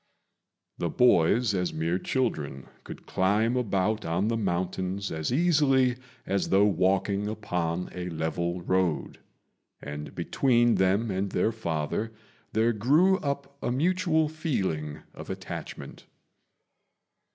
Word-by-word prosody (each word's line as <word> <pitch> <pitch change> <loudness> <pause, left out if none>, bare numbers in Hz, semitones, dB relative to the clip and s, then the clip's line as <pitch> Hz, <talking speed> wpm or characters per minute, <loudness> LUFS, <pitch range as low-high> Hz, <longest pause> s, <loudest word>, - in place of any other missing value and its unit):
The 85 - -1
boys, 110 +2 +4
as 90 -2 -1
mere 85 +3 0
children, 75 - -2 0.2
could - - -10
climb 105 +6 +1
about 105 -2 0
on 85 +6 0
the 115 - +1
mountains 95 -1 -2
as 80 +3 -2
easily 135 -5 +3 0.3
as 100 0 -1
though 100 +1 +5
walking 100 +1 +1
upon 90 -5 -2
a 90 0 -4
level 85 +2 -2
road; 95 -3 0 0.6
and 75 +1 -7
between 120 -3 +2
them 100 +4 +2
and 95 +1 -1
their 110 - +1
father 95 0 -2 0.4
there 115 +2 +2
grew 155 - +3
up 140 -1 -4
a - - -1
mutual 160 +2 +2
feeling 95 - -3
of - - -10
attachment. - - -7
100 Hz, 120 wpm, -27 LUFS, 85-125 Hz, 0.6 s, though